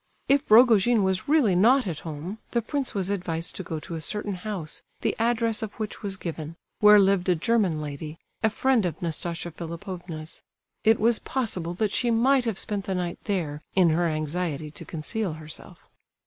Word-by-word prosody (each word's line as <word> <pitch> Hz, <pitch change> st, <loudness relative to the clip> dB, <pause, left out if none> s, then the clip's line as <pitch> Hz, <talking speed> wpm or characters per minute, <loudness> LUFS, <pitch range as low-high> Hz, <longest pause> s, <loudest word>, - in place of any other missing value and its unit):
If 280 Hz, +1 st, +2 dB
Rogojin 225 Hz, -1 st, +6 dB
was 190 Hz, -1 st, 0 dB
really 280 Hz, -, +4 dB
not 245 Hz, +8 st, +5 dB
at 170 Hz, -6 st, -3 dB
home, 165 Hz, +7 st, -6 dB
the 235 Hz, -, +2 dB
prince 275 Hz, +2 st, -3 dB
was 195 Hz, -1 st, 0 dB
advised 170 Hz, -4 st, -2 dB
to 190 Hz, -, -5 dB
go 160 Hz, -2 st, -4 dB
to 170 Hz, -, -8 dB
a 160 Hz, -, -4 dB
certain 210 Hz, +4 st, -3 dB
house, 180 Hz, -4 st, -4 dB, 0.2 s
the -, -, 0 dB
address 230 Hz, -1 st, +1 dB
of 220 Hz, -2 st, -5 dB
which 215 Hz, -1 st, -4 dB
was 195 Hz, -2 st, -2 dB
given, 165 Hz, -2 st, -6 dB, 0.2 s
where 210 Hz, 0 st, +8 dB
lived 195 Hz, -2 st, +3 dB
a 180 Hz, -, +4 dB
German 185 Hz, -2 st, +1 dB
lady, 150 Hz, +2 st, -6 dB, 0.2 s
a 220 Hz, -, +3 dB
friend 235 Hz, -2 st, +2 dB
of 160 Hz, -3 st, -5 dB
Nastasia 170 Hz, +1 st, -3 dB
Philipovna's. 170 Hz, -1 st, -7 dB, 0.4 s
It 220 Hz, +1 st, +4 dB
was 230 Hz, +1 st, +3 dB
possible 185 Hz, -10 st, -2 dB
that 210 Hz, +2 st, 0 dB
she 245 Hz, -, +1 dB
might 250 Hz, +3 st, +3 dB
have 225 Hz, -5 st, -1 dB
spent 205 Hz, -2 st, -2 dB
the 190 Hz, -, -2 dB
night 175 Hz, -1 st, -3 dB
there 160 Hz, -8 st, -2 dB
in 180 Hz, -4 st, +5 dB
her 170 Hz, +2 st, +2 dB
anxiety 155 Hz, -1 st, -2 dB
to 145 Hz, -, -10 dB
conceal 180 Hz, +4 st, -3 dB
herself. 155 Hz, 0 st, -11 dB
190 Hz, 185 wpm, -26 LUFS, 165-220 Hz, 0.4 s, where